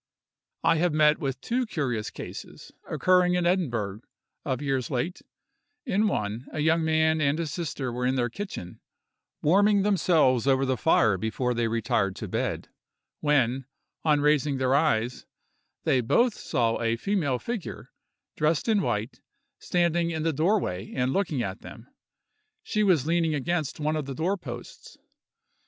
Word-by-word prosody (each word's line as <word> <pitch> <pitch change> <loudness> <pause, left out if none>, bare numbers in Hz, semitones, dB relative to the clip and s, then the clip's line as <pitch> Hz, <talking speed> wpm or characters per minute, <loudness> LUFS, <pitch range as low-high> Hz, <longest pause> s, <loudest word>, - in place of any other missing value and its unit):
I 165 - +4
have 175 0 +1
met 150 0 +4
with 135 -3 -3
two 245 +1 -1
curious 125 - -2
cases, - - -9 0.2
occurring 180 -1 +3
in 180 -1 +1
Edinburgh, 120 - 0 0.4
of 130 -3 -2
late - - -10
years; 135 +4 -2 0.6
in 215 -3 +2
one, 110 - -2
a - - -5
young 160 +2 +2
man 160 0 +2
and 140 0 +2
his 165 -3 -3
sister 145 -7 -3
were 125 +1 -1
in 130 - +1
their 120 -2 +1
kitchen, 120 - -7 0.6
warming 200 +5 +4
themselves 160 - +3
over 135 0 +3
the 130 0 +1
fire 110 - +3
before 125 +4 -1
they 120 -1 0
retired 105 -4 0
to - - -6
bed, - - -2 0.5
when, 135 -3 +1 0.4
on 150 -2 +3
raising 150 -1 +2
their 130 0 +1
eyes, 125 -5 +1 0.6
they 130 - +2
both 235 - +3
saw 115 - -1
a 115 0 +1
female 160 - 0
figure, 225 - -6 0.4
dressed 155 +4 +1
in 215 -3 +3
white, 105 - -2 0.4
standing 170 -1 +1
in 160 -2 -3
the 165 0 +1
door 175 +9 +2
way 90 - -4
and 130 0 0
looking 160 -10 0
at 95 -1 -5
them; 115 - -11 0.8
she 215 - -1
was 180 -10 +3
leaning 165 -1 +1
against 155 +1 -2
one 155 +1 0
of 155 -2 -2
the 135 - -5
door 175 +8 0
posts. 185 - -10
150 Hz, 155 wpm, -27 LUFS, 125-175 Hz, 0.8 s, I